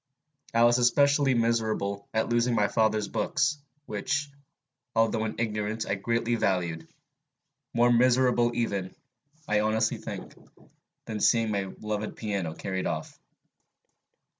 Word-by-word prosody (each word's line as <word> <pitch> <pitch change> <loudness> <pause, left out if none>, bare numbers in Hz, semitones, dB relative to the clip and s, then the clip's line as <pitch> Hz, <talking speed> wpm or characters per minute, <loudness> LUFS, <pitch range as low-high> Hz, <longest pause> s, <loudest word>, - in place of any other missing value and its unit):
I 115 - +5
was 120 +1 +5
especially 140 +2 +3
miserable 110 -4 0
at 110 0 0
losing 120 0 +1
my 105 -2 +3
father's 110 -1 +1
books, 145 +2 0 0.3
which, 140 +8 -2 0.6
although 115 0 +2
in 110 - -4
ignorance, 110 -1 -2
I - - -1
greatly 115 +4 -1
valued, 90 -7 -1 0.9
more 120 +1 +4
miserable 125 0 +4
even, 100 -5 -2 0.5
I 105 0 +2
honestly 110 +1 +1
think, - - -7 0.7
than 110 - -4
at - - -6
seeing 115 -2 +3
my 100 -2 -2
loved 105 0 -3
piano 100 -7 -3
carried 95 -1 -3
off. - - -4
110 Hz, 125 wpm, -27 LUFS, 105-120 Hz, 0.9 s, I